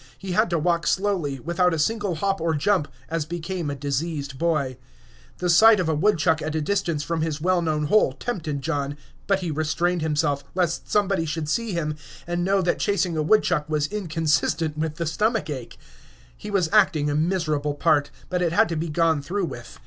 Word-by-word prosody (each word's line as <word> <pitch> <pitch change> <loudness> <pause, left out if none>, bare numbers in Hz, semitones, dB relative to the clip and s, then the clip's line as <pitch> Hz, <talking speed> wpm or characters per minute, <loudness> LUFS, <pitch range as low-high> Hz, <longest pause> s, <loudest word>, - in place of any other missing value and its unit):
He 190 -1 -6
had 215 +3 +2
to 170 - +1
walk 170 +1 0
slowly, 185 -9 0
without 170 +4 +1
a - - -3
single 205 +2 0
hop 195 +2 -1
or 165 -1 +1
jump, 155 +1 +1 0.2
as 165 -1 -1
became 170 +1 -4
a 140 - -3
diseased 140 0 -3
boy. 150 -7 0 0.6
The 180 - -2
sight 215 +5 +7
of 180 - 0
a 160 - +1
woodchuck 160 -2 +2
at 155 0 -3
a - - +1
distance 170 -2 -1
from 165 +1 -2
his 155 -2 -2
well 180 +2 +2
known 155 -2 0
hole 210 +9 +3
tempted 155 - -4
John, 140 +2 -2 0.3
but 195 -1 +2
he 175 -3 -2
restrained 160 +3 0
himself, 150 -2 0
lest 175 -3 -1
somebody 195 -5 +1
should 155 0 -3
see 225 +6 -1
him, 155 -3 -2 0.3
and 175 0 -2
know 195 +1 +2
that 175 - 0
chasing 185 -4 0
a 155 - 0
woodchuck 155 -3 +2
was 150 -1 +1
inconsistent 160 -4 0
with 155 0 -2
the 170 - -3
stomach 210 +2 0
ache. 130 -5 -7 0.6
He 210 - -9
was 195 -5 +1
acting 190 -8 +4
a 145 - 0
miserable 155 -3 0
part, 145 -2 +2 0.2
but 180 -1 -1
it 170 -2 +1
had 220 +4 +4
to 165 - -2
be 160 +1 -2
gone 160 -1 +2
through 185 +6 -2
with. 120 -7 -9
165 Hz, 200 wpm, -24 LUFS, 150-185 Hz, 0.6 s, sight